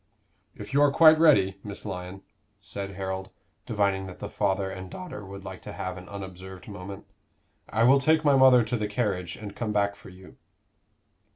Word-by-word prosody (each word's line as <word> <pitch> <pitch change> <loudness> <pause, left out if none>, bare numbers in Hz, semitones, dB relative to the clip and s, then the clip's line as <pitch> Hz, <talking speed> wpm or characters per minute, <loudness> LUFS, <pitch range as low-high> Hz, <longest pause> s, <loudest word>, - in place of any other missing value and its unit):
"If - - -9
you 140 - +4
are 145 - +6
quite 155 +1 +7
ready, 100 - +4
Miss 100 -1 -8
Lyon," 90 +2 -6 0.4
said 100 -1 -7
Harold, 95 0 -4 0.4
divining 100 -3 0
that 90 - -10
the - - -7
father 100 -1 0
and 95 -1 -7
daughter 175 - -8
would 100 0 -9
like - - -8
to - - -8
have 95 0 -4
an 90 -1 -11
unobserved 95 -2 -9
moment, 100 -1 -8 0.6
"I 110 - +1
will 135 +3 +6
take 155 +3 +3
my 145 -1 +5
mother 130 -2 +7
to 115 +2 -2
the 105 -1 -2
carriage 100 -5 -2
and 100 -1 -9
come 115 -3 -3
back 100 -1 +1
for - - -14
you." 95 0 -15
100 Hz, 185 wpm, -27 LUFS, 95-120 Hz, 0.6 s, quite